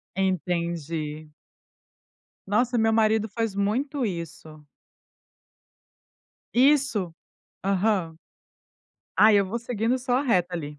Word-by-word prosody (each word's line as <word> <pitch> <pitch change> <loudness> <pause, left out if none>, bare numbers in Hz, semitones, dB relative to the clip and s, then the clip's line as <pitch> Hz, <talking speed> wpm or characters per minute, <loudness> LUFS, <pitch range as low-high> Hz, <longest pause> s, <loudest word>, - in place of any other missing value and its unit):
Entendi. 170 -5 -2 1.2
Nossa, 240 +4 +1
meu 225 0 +3
marido 220 -1 +2
faz 225 -1 -3
muito 250 +7 -1
isso. 160 -4 -7 1.9
Isso. 250 - +3 0.5
Aham. 195 -4 0 1.0
Ai, 215 -1 +6
eu 195 - -1
vou 230 +5 -3
seguindo 235 +1 -1
só 250 0 -3
a - - 0
reto 185 -9 +2
ali. 150 -4 -5
200 Hz, 95 wpm, -25 LUFS, 170-230 Hz, 1.9 s, Ai